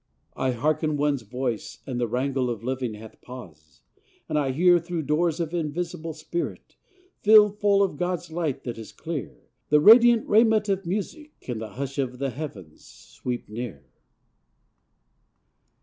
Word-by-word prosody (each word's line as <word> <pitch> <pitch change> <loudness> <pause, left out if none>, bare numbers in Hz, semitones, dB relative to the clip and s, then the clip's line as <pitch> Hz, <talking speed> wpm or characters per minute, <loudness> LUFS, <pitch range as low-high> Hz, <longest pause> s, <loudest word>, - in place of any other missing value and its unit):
I 130 - 0
hearken 150 +4 0
one's 145 -2 +1
voice, 120 +1 -4
and 125 -3 -4
the 120 - 0
wrangle 130 +2 -1
Of 115 -3 -4
living 130 -3 -2
hath 110 +1 -13
pause: 80 - -12 0.5
and 155 - -3
I 145 -3 +1
hear, 175 +5 +5
Through 170 -1 -4
doors 155 +3 +1
of 165 -1 -3
invisible 165 0 -3
spirit, 160 +2 -5 0.5
Filled 210 -1 +6
full 200 -1 +4
of 185 -7 -2
God's 180 -1 -2
light 160 -5 -2
that 120 -2 -5
is 110 - -9
clear, 160 -4 -6 0.3
The 150 - +5
radiant 235 +6 +7
raiment 215 -1 +4
of 195 -2 -1
Music, 295 - -4
In 120 -3 -5
the 110 -1 -7
hush 140 +1 -5
of 125 -2 -2
the 135 0 -2
heavens, 105 - -8
sweep 125 -1 -7
near. 105 - -7
150 Hz, 150 wpm, -25 LUFS, 125-175 Hz, 0.5 s, radiant